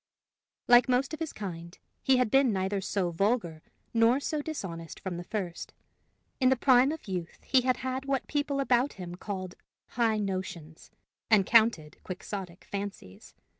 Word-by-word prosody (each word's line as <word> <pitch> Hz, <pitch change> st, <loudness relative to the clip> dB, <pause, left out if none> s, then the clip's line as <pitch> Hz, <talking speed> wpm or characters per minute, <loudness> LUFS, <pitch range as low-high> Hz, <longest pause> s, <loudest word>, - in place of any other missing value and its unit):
Like 245 Hz, +1 st, +6 dB
most 255 Hz, +5 st, +1 dB
of 315 Hz, -, -5 dB
his 325 Hz, -2 st, -3 dB
kind, 170 Hz, -4 st, -7 dB, 0.2 s
he 265 Hz, -1 st, +4 dB
had 250 Hz, -4 st, +1 dB
been 270 Hz, -3 st, +5 dB
neither 190 Hz, 0 st, -1 dB
so 190 Hz, -2 st, -1 dB
vulgar 175 Hz, -3 st, 0 dB, 0.3 s
nor 230 Hz, +3 st, +4 dB
so 300 Hz, +1 st, -2 dB
dishonest 185 Hz, -, -6 dB
from 185 Hz, -3 st, -5 dB
the 175 Hz, -, -5 dB
first. 180 Hz, -3 st, -5 dB, 0.6 s
In 255 Hz, -2 st, +4 dB
the 265 Hz, -, +4 dB
prime 260 Hz, +1 st, +5 dB
of 320 Hz, -6 st, -7 dB
youth 180 Hz, -3 st, -5 dB
he 260 Hz, -, +3 dB
had 255 Hz, 0 st, +1 dB
had 260 Hz, +1 st, -3 dB
what 275 Hz, -1 st, 0 dB
the -, -, -33 dB
people 285 Hz, -1 st, 0 dB
about 260 Hz, 0 st, +2 dB
him 180 Hz, -2 st, -8 dB
called 185 Hz, 0 st, -5 dB, 0.4 s
high 225 Hz, -2 st, +1 dB
notions, 185 Hz, -6 st, -5 dB, 0.4 s
and 210 Hz, -4 st, +5 dB
counted 220 Hz, -10 st, +3 dB
quixotic 185 Hz, -1 st, -7 dB
fancies. 200 Hz, -, -7 dB
215 Hz, 165 wpm, -29 LUFS, 180-255 Hz, 0.6 s, Like